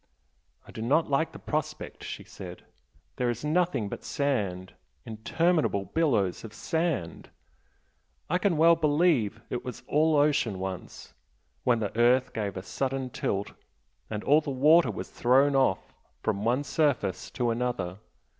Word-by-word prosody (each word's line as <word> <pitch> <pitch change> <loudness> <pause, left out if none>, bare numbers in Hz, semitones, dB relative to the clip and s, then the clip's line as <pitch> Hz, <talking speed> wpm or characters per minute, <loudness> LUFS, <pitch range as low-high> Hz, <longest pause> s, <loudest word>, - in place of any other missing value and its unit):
"I - - -11
do 110 - -7
not 145 +6 +2
like 160 +4 +1
the - - -10
prospect" 155 -1 -4
she - - -6
said - - -10 0.5
"There 125 -1 +1
is 120 +4 -3
nothing 170 - +1
but - - -7
sand 100 - -2 0.3
interminable 115 - 0
billows 115 - 0
of 110 -1 -9
sand! 160 - -2 1.0
I 180 +3 +1
can 180 -3 +1
well 165 +2 +6
believe 150 - +2
it 125 - -3
was 125 -3 -7
all 155 +1 +2
ocean 145 -8 +2
once, 95 -1 -7 0.5
when 120 -2 +3
the 105 - -3
earth 125 +2 +3
gave 105 -3 -3
a 95 - -5
sudden 130 +4 -3
tilt, 100 -2 -2 0.6
and 105 -1 -4
all 150 +3 +5
the 150 - -6
water 150 +6 +5
was - - -6
thrown 135 +3 +3
off 130 -9 +1 0.3
from 105 -2 -1
one 125 +5 +1
surface 140 - 0
to 120 -2 +1
another. 115 -6 -2
130 Hz, 145 wpm, -28 LUFS, 110-150 Hz, 1.0 s, well